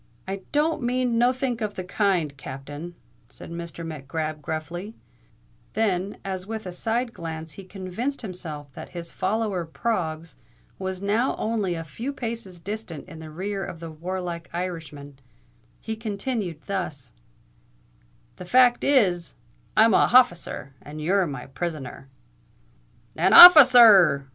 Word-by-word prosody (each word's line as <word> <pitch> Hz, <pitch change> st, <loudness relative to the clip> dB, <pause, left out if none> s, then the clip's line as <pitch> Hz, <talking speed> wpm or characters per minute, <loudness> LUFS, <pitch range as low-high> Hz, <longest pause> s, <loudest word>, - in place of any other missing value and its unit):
"It 195 Hz, 0 st, -7 dB
don't 310 Hz, +2 st, +1 dB
mean 245 Hz, -1 st, 0 dB
nothink 250 Hz, 0 st, 0 dB
of 210 Hz, -1 st, -3 dB
the 185 Hz, -, -5 dB
kind, 180 Hz, -6 st, 0 dB
Captain," 145 Hz, +6 st, -8 dB, 0.3 s
said -, -, -11 dB
Mr. 170 Hz, 0 st, -7 dB
Mac 155 Hz, -4 st, -8 dB
Grab 155 Hz, +1 st, -4 dB
gruffly: 170 Hz, +8 st, -6 dB, 0.8 s
then, 200 Hz, -3 st, -1 dB
as 190 Hz, -1 st, -4 dB
with 220 Hz, -1 st, -5 dB
a 180 Hz, -, -5 dB
side 230 Hz, +6 st, -2 dB
glance 160 Hz, -1 st, -7 dB
he 195 Hz, -, -11 dB
convinced 195 Hz, +9 st, -5 dB
himself 155 Hz, -8 st, -6 dB
that -, -, -9 dB
his 170 Hz, -1 st, -5 dB
follower 205 Hz, -2 st, -1 dB
Proggs 165 Hz, -, -3 dB, 0.4 s
was 190 Hz, 0 st, -5 dB
now 220 Hz, +6 st, +1 dB
only 215 Hz, -5 st, -2 dB
a 165 Hz, -, -5 dB
few 225 Hz, -, -6 dB
paces 230 Hz, -8 st, -6 dB
distant 195 Hz, -4 st, -7 dB
in 160 Hz, -, -11 dB
the 160 Hz, -1 st, -9 dB
rear 195 Hz, +5 st, -4 dB
of 165 Hz, -, -7 dB
the 165 Hz, -1 st, -8 dB
warlike 175 Hz, +1 st, -5 dB
Irishman, 160 Hz, -6 st, -6 dB, 0.6 s
he 220 Hz, -, -5 dB
continued 210 Hz, -, -4 dB
thus:—"The 110 Hz, -, -10 dB
fact 245 Hz, +4 st, +4 dB
is, 190 Hz, -12 st, +2 dB, 0.4 s
I'm 220 Hz, 0 st, +6 dB
a -, -, +5 dB
hofficer—and 155 Hz, -, +1 dB
you're 185 Hz, +4 st, +1 dB
my 135 Hz, -4 st, -6 dB
prisoner." 135 Hz, -2 st, -6 dB, 1.1 s
"An -, -, +2 dB
officer 300 Hz, -8 st, +11 dB
r 215 Hz, -6 st, +9 dB
r!" 140 Hz, -4 st, -1 dB
180 Hz, 135 wpm, -24 LUFS, 160-220 Hz, 1.1 s, officer